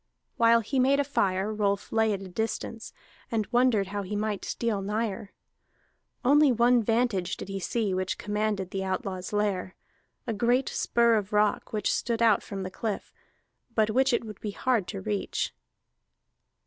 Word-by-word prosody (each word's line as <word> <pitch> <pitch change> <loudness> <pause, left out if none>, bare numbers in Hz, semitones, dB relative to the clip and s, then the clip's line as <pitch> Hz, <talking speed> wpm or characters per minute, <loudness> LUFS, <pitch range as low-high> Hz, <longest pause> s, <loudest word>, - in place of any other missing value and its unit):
While 230 0 +5
he 260 +5 -1
made 270 +2 +4
a - - +3
fire, 200 -6 0
Rolf 200 -1 -1
lay 220 -1 +3
at 195 -1 -3
a - - -7
distance, 225 +3 -4 0.4
and 220 -2 0
wondered 240 -6 +3
how 205 0 -3
he 200 +2 -5
might 210 -1 -2
steal 225 -4 -1
nigher. 205 0 -3 0.9
Only 290 +1 +6
one 240 +1 +4
vantage 225 -5 0
did - - -8
he 195 0 -3
see 205 +1 -1
which 185 0 -1
commanded 210 -2 -2
the 190 0 -2
outlaw's 190 -1 -3
lair: 200 -3 -1 0.5
a 230 - -2
great 240 +5 +2
spur 235 -1 +2
of 205 0 -4
rock 210 0 +1
which 215 -1 0
stood 235 -1 0
out 220 -3 +5
from 195 -1 -6
the 185 - -5
cliff, 215 +1 -4 0.6
but 220 -1 +3
which 265 +4 +3
it 235 - 0
would 215 -3 -9
be 215 - -3
hard 220 -1 0
to - - -5
reach. 100 -1 -2
215 Hz, 170 wpm, -28 LUFS, 195-235 Hz, 0.9 s, Only